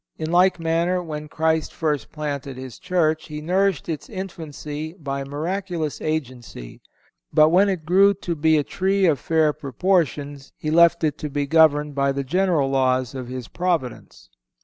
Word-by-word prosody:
In 160 0 -4
like 180 +1 +4
manner, 170 +2 0
when 150 -2 -6
Christ 160 0 0
first 150 -3 -2
planted 140 -3 -5
His 130 -3 -9
Church 160 -4 0
He 150 -1 -6
nourished 185 0 0
its 160 -3 -5
infancy 160 -5 -6
by 140 -6 -5
miraculous 165 +2 -3
agency; 125 - -5 0.5
but 155 0 +5
when 190 +4 +4
it 180 -5 -3
grew 195 +4 +5
to 180 -2 -4
be 160 0 +3
a 150 - +1
tree 190 +5 0
of 155 -6 +2
fair 160 0 +2
proportions 145 -1 -1
He 155 - -3
left 170 +1 +5
it 150 -2 0
to 150 - -4
be 145 0 -1
governed 150 -1 +3
by 140 0 +1
the 140 0 -2
general 165 -2 +1
laws 130 -1 +1
of 130 -2 -6
His 125 -1 -6
Providence. 165 - -3
155 Hz, 165 wpm, -22 LUFS, 140-175 Hz, 0.5 s, but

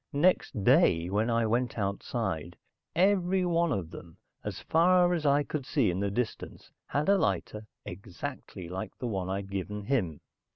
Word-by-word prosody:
Next 145 - +2
day, 95 - +4
when 105 +4 +1
I 115 -1 +2
went 120 +2 0
outside, 100 -4 -3 0.4
everyone 180 -2 +2
of 90 - -2
them, 85 -1 -11 0.3
as - - -5
far 175 +2 +4
as 160 -4 0
I 140 +1 +4
could 145 -1 -4
see 130 - +1
in 90 - -3
the 100 0 0
distance, 115 +4 -4 0.2
had 145 +1 -1
a 200 0 +5
lighter, 105 - -1 0.2
exactly 100 -2 -7
like 95 +3 -6
the - - -5
one 95 -5 -2
I'd 95 0 -3
given 100 +2 -4
him. 100 - -1
115 Hz, 160 wpm, -29 LUFS, 95-150 Hz, 0.4 s, a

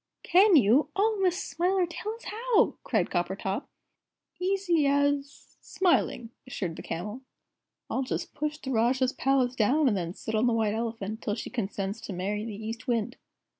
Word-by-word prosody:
"Can 385 +1 +6
you? 255 +2 +5
Oh, 425 +1 +2
Miss 365 0 +1
Smiler, 360 +5 +1
tell 420 +6 -5
us 460 - -16
how!" 465 +1 +2
cried 215 -7 0
Coppertop. 190 +5 -2 0.7
"Easy 360 -5 +2
as 285 0 0
smiling," 335 -10 +1 0.2
assured 185 -9 -4
the - - -8
Camel. 210 +9 -5 0.7
"I'll - - -1
just 260 - -3
push 300 +1 -3
the 265 -3 -6
Rajah's 255 +2 +2
Palace 265 -2 +2
down, 265 +7 +3
and 225 - +3
then 175 -1 -3
sit 220 - -6
on 220 +3 +3
the 240 - +2
White 220 -2 +1
Elephant 220 -1 -4
till 205 - -1
she 225 - -6
consents 200 -3 -3
to 200 - -6
marry 200 +4 -2
the 215 -1 -6
East 230 +3 -6
Wind." 240 0 0
250 Hz, 170 wpm, -28 LUFS, 215-315 Hz, 0.7 s, Can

